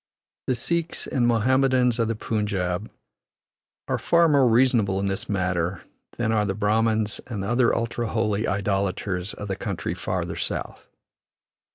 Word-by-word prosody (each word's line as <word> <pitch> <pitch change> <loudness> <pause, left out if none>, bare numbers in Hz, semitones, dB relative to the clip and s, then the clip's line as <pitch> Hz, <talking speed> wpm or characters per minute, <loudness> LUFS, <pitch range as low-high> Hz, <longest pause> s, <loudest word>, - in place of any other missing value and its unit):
The 130 - +2
Sikhs 165 +7 -2
and 120 -2 +1
Mohammedans 125 +1 +3
of 115 - +2
the 115 - -1
Punjab 105 -3 -2 1.0
are - - -1
far 170 0 +4
more 140 -4 +4
reasonable 115 -5 +3
in 100 - -1
this 100 +4 -2
matter 90 -3 -1 0.3
than 120 -2 0
are 110 -2 +2
the 95 -2 -1
Brahmans 110 0 +1
and 105 -6 -4
other 120 +3 +3
ultra 115 0 -2
holy 110 -1 0
idolaters 95 -1 -1
of 105 - -7
the 95 - -2
country - - -3
farther - - -3
south. - - -4
110 Hz, 145 wpm, -24 LUFS, 100-120 Hz, 1.0 s, far